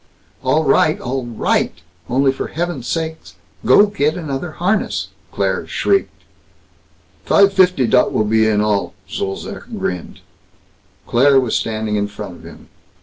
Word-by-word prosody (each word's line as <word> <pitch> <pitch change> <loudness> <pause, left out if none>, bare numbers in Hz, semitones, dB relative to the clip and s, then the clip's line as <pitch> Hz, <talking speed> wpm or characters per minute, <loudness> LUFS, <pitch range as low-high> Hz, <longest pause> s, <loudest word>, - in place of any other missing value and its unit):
"All 150 +5 +2
right! 155 0 +3
All 130 0 -3
right! 115 -2 0 0.3
Only 135 +2 +3
for 135 - -5
heaven's 165 -7 -4
sake 160 -1 -2 0.5
go 205 - +7
get 160 -7 0
another 155 -1 -4
harness!" 195 +6 -1 0.2
Claire - - -1
shrieked. 395 -1 0 1.0
"Fife 200 0 +4
fifty 185 -8 +4
dot 125 +1 +3
will 110 - +1
be, 110 +1 +3
in 105 -1 +2
all." 105 -2 0
Zolzac 95 0 -5
grinned. 90 -2 -4 0.8
Claire 135 +3 +4
was 125 -4 -1
standing 110 -1 -1
in 105 0 0
front 100 -3 -8
of - - -17
him. - - -13
135 Hz, 140 wpm, -18 LUFS, 110-165 Hz, 1.0 s, go